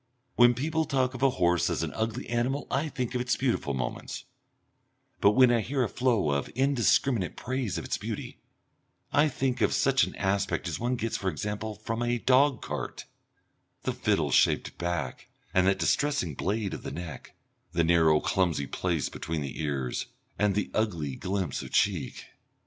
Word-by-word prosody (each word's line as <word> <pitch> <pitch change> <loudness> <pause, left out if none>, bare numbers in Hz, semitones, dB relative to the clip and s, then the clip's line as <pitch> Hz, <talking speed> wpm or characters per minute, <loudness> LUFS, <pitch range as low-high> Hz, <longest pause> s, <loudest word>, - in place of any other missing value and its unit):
When 120 0 +6
people 160 +5 0
talk 130 -3 +1
of 130 - -7
a 135 - +5
horse 90 -6 +2
as - - -1
an - - -3
ugly 115 +3 -3
animal 125 +4 -1
I 150 +3 0
think 125 -3 -3
of 125 - 0
its 125 0 +1
beautiful 120 - 0
moments, 65 - -4 1.0
but 100 - +5
when 130 0 +6
I 120 -2 +3
hear 130 +4 0
a - - +1
flow 120 - +1
of 70 0 -1
indiscriminate 130 -5 +2
praise 125 -7 -2
of 80 - -4
its - - -2
beauty - - -5 0.7
I 150 +1 +4
think 130 -2 -1
of - - +3
such 135 -1 +3
an - - -3
aspect 100 0 0
as - - -3
one 120 +2 0
gets 115 -1 -2
for 95 - -1
example 105 +5 -4
from 115 +2 -4
a 120 0 +1
dog 130 +1 +3
cart, - - -5 0.8
the - - -1
fiddle - - +1
shaped - - +3
back, 85 0 -3 0.3
and 95 0 +4
that 95 - +3
distressing 140 - +1
blade 100 +6 -2
of - - -5
the - - -6
neck, 80 +1 -8 0.4
the 85 -1 +2
narrow 80 -2 +4
clumsy 85 -7 +1
place 85 +3 -1
between 80 -1 -4
the 70 +2 -5
ears, 70 -5 -2 0.3
and 105 -2 +2
the 105 - -1
ugly 85 -11 -1
glimpse 95 -3 -2
of - - -8
cheek. - - 0
110 Hz, 175 wpm, -28 LUFS, 85-130 Hz, 1.0 s, When